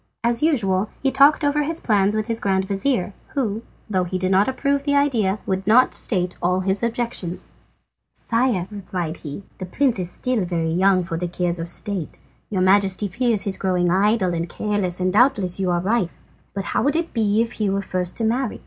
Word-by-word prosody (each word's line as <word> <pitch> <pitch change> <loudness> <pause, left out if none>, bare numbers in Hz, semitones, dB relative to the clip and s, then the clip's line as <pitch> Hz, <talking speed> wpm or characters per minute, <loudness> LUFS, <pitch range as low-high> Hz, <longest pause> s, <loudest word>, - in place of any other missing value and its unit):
As 235 0 +1
usual 215 - +1
he 270 - +2
talked 280 +4 +5
over 290 +1 +2
his 320 +3 -1
plans 205 -2 +2
with 215 0 -1
his 230 -1 -1
grand 190 -1 0
vizir, 200 0 -1 0.2
who, 225 -6 -1 0.3
though 190 -4 0
he 180 +1 -3
did 185 +1 -1
not 195 +2 +4
approve 280 +1 0
the 285 0 +1
idea, 235 -9 +2
would 190 0 -2
not 245 +4 +5
state 180 -5 -1
all 180 +1 +1
his 190 +1 -1
objections. 230 -7 -3 0.6
"Sire," 230 -6 0
he 210 - -11
replied, 175 -4 -4 0.4
"the 185 - -4
prince 250 +2 +1
is 175 -1 -3
still 250 +1 -1
very 165 -2 -1
young 185 +2 +3
for 170 -1 -4
the 175 +1 -2
cares 175 0 -1
of 165 +1 -5
state. 190 -2 -2 0.3
Your 190 -3 0
Majesty 195 +1 +3
fears 225 +2 0
his 195 -2 0
growing 180 -2 +1
idle 195 -1 +2
and 170 0 -3
careless, 200 -4 -1
and 185 0 0
doubtless 205 -6 +3
you 190 -1 0
are 175 -1 +1
right. 195 0 0 0.5
But 195 - -2
how - - +2
would 285 +2 +1
it 335 0 -2
be 220 -1 +2
if 230 - -6
he 205 - +2
were 195 +1 -1
first 180 -2 -3
to 230 - -2
marry? 240 +2 -1
200 Hz, 205 wpm, -22 LUFS, 185-235 Hz, 0.6 s, talked